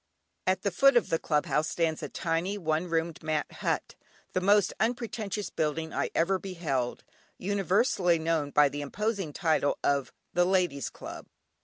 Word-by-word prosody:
At 185 0 +1
the 200 - +1
foot 275 +7 +5
of 240 - +2
the 165 - +2
Club 150 -2 +1
House 155 +1 +1
stands 160 -2 0
a - - -4
tiny, 170 +4 -1
one 160 -1 -1
roomed, 165 0 -1
mat 155 -1 0
hut, - - -2 0.4
the 185 - +1
most 200 0 +4
unpretentious 220 -2 -2
building 160 +1 -2
I - - 0
ever 185 +3 +2
beheld, 160 -10 -2 0.3
universally 195 -2 +2
known 160 -2 0
by 145 0 +5
the 145 +1 -4
imposing 200 +3 -2
title 155 -3 +1
of 140 -2 +1 0.2
"The 175 0 +4
Ladies 180 -7 +1
Club." - - -9
170 Hz, 160 wpm, -29 LUFS, 155-195 Hz, 0.4 s, foot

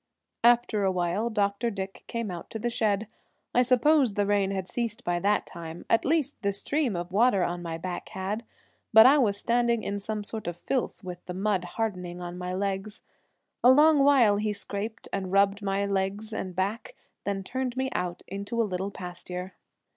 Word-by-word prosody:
After 240 -3 +4
awhile 185 +4 0
Dr. 205 +1 0
Dick 195 -2 -6
came 230 -4 -3
out 175 -1 -7
to 225 - -5
the 240 +2 -2
shed. 215 -3 +1 0.5
I 250 - +5
suppose 255 -1 +4
the 205 - +2
rain 200 -1 +2
had 190 -2 -3
ceased 235 +1 -3
by 175 0 0
that 205 +3 +1
time, 165 0 -9
at 230 - +3
least 295 -2 0
the 200 - +1
stream 265 +2 0
of 175 +1 -4
water 205 -1 +4
on 175 0 -2
my 165 -1 -4
back 180 +2 -5
had, 195 +4 -3 0.5
but 220 0 +9
I 280 +3 +7
was 205 -6 +2
standing 235 +1 +1
in 200 0 -2
some 210 +1 -4
sort 215 -1 -6
of 175 -1 -3
filth, 245 +3 -2
with 180 -1 -7
the 180 - -5
mud 195 -1 0
hardening 180 -6 -2
on 175 0 -6
my 180 0 -4
legs. 195 +2 -3 0.6
A 245 - +8
long 300 +3 +6
while 250 -8 +5
he 210 0 0
scraped 205 +2 -5
and 190 -2 -2
rubbed 200 +1 +3
my 200 0 0
legs 200 +2 -2
and 185 -4 -4
back, 210 - -2 0.3
then 195 -1 -2
turned 255 +3 -3
me 265 0 -1
out 180 -1 -3
into 200 +4 -4
a - - +5
little 190 0 -3
pasture. 180 0 -6
200 Hz, 190 wpm, -27 LUFS, 185-235 Hz, 0.6 s, but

